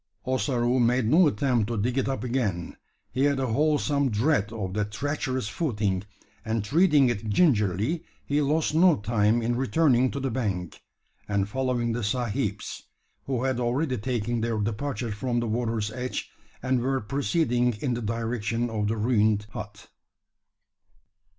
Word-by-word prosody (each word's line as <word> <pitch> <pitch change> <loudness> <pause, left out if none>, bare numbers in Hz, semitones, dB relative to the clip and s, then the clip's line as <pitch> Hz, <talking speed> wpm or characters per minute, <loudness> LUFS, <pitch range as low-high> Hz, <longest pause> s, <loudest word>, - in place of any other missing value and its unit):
Ossaroo 125 0 +1
made 120 0 +3
no 160 +9 +5
attempt 120 -3 +1
to 115 - -2
dig 120 +5 0
it 135 0 0
up 135 - -2
again. 110 -9 -2 0.4
He 130 +3 +1
had 140 -1 +2
a 135 - 0
wholesome 145 -1 +2
dread 110 -1 +1
of 100 -5 -4
that 105 0 -1
treacherous 130 -1 -2
footing; 105 - -1 0.4
and 110 -1 -1
treading 150 - +4
it 110 -2 -3
gingerly, 110 - +2 0.2
he 145 +1 +1
lost 150 +2 +1
no 170 +1 +5
time 110 +2 +1
in 120 +1 0
returning 130 +1 +3
to 140 - -4
the 135 -1 -2
bank, 100 -8 -3 0.5
and 100 -1 0
following 125 0 -1
the 120 +2 -2
sahibs 110 -1 -2 0.5
who 130 -2 -1
had 130 -2 0
already 125 +2 0
taken 120 0 -1
their 115 -1 -1
departure 115 +3 -2
from 120 +3 -1
the 120 - -1
water's 110 -2 -1
edge, 125 +2 -4 0.3
and 130 -1 +1
were 135 +2 0
proceeding 125 0 +1
in 125 +4 -2
the 120 - -3
direction 115 +1 -2
of 105 -2 -1
the 110 +1 -1
ruined 105 -2 +2
hut. 105 -2 -8
120 Hz, 155 wpm, -26 LUFS, 105-135 Hz, 0.5 s, no